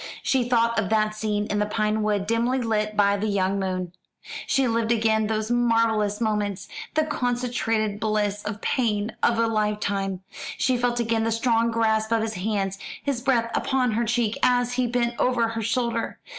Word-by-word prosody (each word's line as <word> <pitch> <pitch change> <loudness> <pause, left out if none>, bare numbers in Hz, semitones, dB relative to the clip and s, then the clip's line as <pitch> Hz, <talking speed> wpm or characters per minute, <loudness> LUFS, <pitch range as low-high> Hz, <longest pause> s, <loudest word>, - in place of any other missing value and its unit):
She 250 -3 +1
thought 230 -1 +2
of 200 -4 -1
that 215 -1 +2
scene 210 -1 -1
in 205 0 -1
the 210 - +1
pine 215 0 0
wood, 205 -2 0
dimly 230 +4 +1
lit 215 -3 -1
by 200 0 +4
the 210 +2 -2
young 195 -1 0
moon. 185 -2 -2 0.6
She 270 -1 +2
lived 230 0 0
again 220 -1 +2
those 220 +1 -2
marvellous 230 -3 +2
moments 210 -4 -1 0.3
the 310 - +3
concentrated 240 -6 -1
bliss 210 -1 -1
and 210 0 -4
pain 220 -4 0
of 235 - +3
a 230 - +3
lifetime. 210 -3 -1 0.4
She 255 - +2
felt 240 0 0
again 225 -1 +1
the 225 - 0
strong 230 0 +2
grasp 220 -1 +1
of 225 -1 +2
his 225 0 -2
hands, 195 -1 -2 0.2
his 275 -4 -1
breath 240 -3 +1
upon 255 -3 +1
her 225 +2 0
cheek, 230 -1 0
as 245 0 +2
he 250 0 +1
bent 235 0 -1
over 240 -2 +2
her 225 0 -3
shoulder. 230 +1 -1
225 Hz, 180 wpm, -24 LUFS, 210-235 Hz, 0.6 s, by